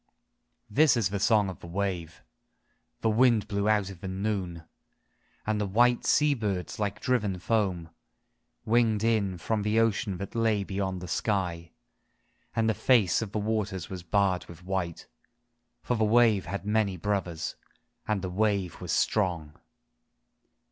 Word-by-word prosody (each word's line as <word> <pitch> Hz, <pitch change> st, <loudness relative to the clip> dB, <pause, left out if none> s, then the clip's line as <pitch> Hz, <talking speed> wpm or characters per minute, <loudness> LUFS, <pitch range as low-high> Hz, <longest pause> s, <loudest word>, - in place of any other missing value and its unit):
IV -, -, -13 dB
This 150 Hz, -4 st, +6 dB
is 105 Hz, -5 st, +1 dB
the 100 Hz, +1 st, -2 dB
song 105 Hz, 0 st, +3 dB
of 95 Hz, -, -7 dB
the -, -, -11 dB
wave! 85 Hz, -3 st, -3 dB, 0.8 s
The 110 Hz, -, +2 dB
wind 115 Hz, -1 st, +3 dB
blew 100 Hz, +1 st, 0 dB
out 105 Hz, -2 st, +1 dB
of 90 Hz, -3 st, -12 dB
the 95 Hz, -, -5 dB
V 95 Hz, -, -4 dB
/ 95 Hz, -, -5 dB
noon, 95 Hz, -5 st, -2 dB, 0.8 s
And 110 Hz, -1 st, 0 dB
the 105 Hz, -, -1 dB
white 120 Hz, +5 st, +3 dB
sea 150 Hz, 0 st, +4 dB
birds 105 Hz, -8 st, -3 dB
like 105 Hz, -1 st, -2 dB
driven 105 Hz, -8 st, 0 dB
foam 90 Hz, -5 st, -1 dB, 0.7 s
Winged 110 Hz, -2 st, +2 dB
in 105 Hz, -5 st, +1 dB
from 110 Hz, +5 st, -1 dB
the 105 Hz, +2 st, +1 dB
ocean 110 Hz, -3 st, +1 dB
that 100 Hz, -, -7 dB
lay 110 Hz, -3 st, +1 dB
beyond 95 Hz, -2 st, -3 dB
the 90 Hz, -, -7 dB
sky 90 Hz, -4 st, -1 dB, 0.9 s
And 115 Hz, -1 st, +2 dB
the 110 Hz, -, +3 dB
face 115 Hz, -5 st, +3 dB
of 110 Hz, -3 st, -4 dB
the -, -, -3 dB
waters 105 Hz, -4 st, -2 dB
was 95 Hz, -2 st, -5 dB
.barred 95 Hz, +1 st, +1 dB
with 85 Hz, 0 st, -12 dB
white, 90 Hz, -3 st, -3 dB, 0.8 s
For 125 Hz, -, 0 dB
the 110 Hz, -, +1 dB
wave 110 Hz, -4 st, +4 dB
had 100 Hz, +2 st, -4 dB
many 105 Hz, -3 st, +1 dB
brothers, 90 Hz, -3 st, -2 dB, 0.5 s
And 105 Hz, -3 st, -1 dB
the 90 Hz, -, -3 dB
wave 100 Hz, -3 st, 0 dB
was -, -, -4 dB
strong 85 Hz, -8 st, 0 dB
100 Hz, 160 wpm, -28 LUFS, 95-110 Hz, 0.9 s, This